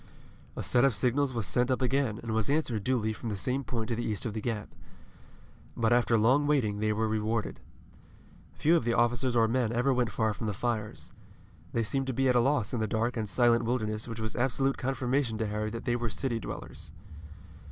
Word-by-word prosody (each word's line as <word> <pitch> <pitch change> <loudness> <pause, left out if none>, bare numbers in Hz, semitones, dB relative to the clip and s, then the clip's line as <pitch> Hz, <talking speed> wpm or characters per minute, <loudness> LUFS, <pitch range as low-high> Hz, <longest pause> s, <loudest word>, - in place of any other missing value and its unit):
A - - -4
set 120 0 +3
of 135 -5 +3
signals 130 +2 +1
was 115 -4 -2
sent 125 +8 +1
up 130 - +1
again 130 -4 +1
and 115 -1 -3
was 110 +1 0
answered 135 -8 0
duly 110 -2 0
from 115 - -6
the 105 - -2
same 130 +7 -1
point 115 -4 -3
to 115 - 0
the 120 - -3
east 105 -2 -2
of 115 - -2
the 110 - -4
Gap. 105 -2 -3 1.1
But 115 0 +3
after 120 -1 +3
long 130 +7 +3
waiting, 115 -9 +1
they 110 0 +1
were 110 +1 0
rewarded. 110 +1 -1 1.0
Few 165 +3 +3
of 165 - +2
the 115 0 +1
officers 120 +1 +1
or 115 -1 +4
men 120 -1 0
ever 125 +3 +2
went 125 -2 +1
far 110 -1 0
from 110 - -5
the 105 - -2
fires. 110 -1 -3 0.6
They 115 - 0
seemed 135 +4 -1
to 130 - -1
be 135 +2 +1
at 125 - +3
a - - +6
loss 125 -3 +1
in 120 - 0
the 110 - 0
dark 115 +3 -1
and 110 -3 -2
silent 120 +1 +3
wilderness 110 -2 -2
which 115 -2 -6
was 110 0 -3
absolute 135 +2 +1
confirmation 130 -2 -1
to 110 - -1
Harry 105 +1 -2
that 115 +2 -6
they 120 - +1
were 120 -1 -2
city 120 +2 -2
dwellers. 75 - -8
115 Hz, 220 wpm, -29 LUFS, 110-130 Hz, 1.1 s, a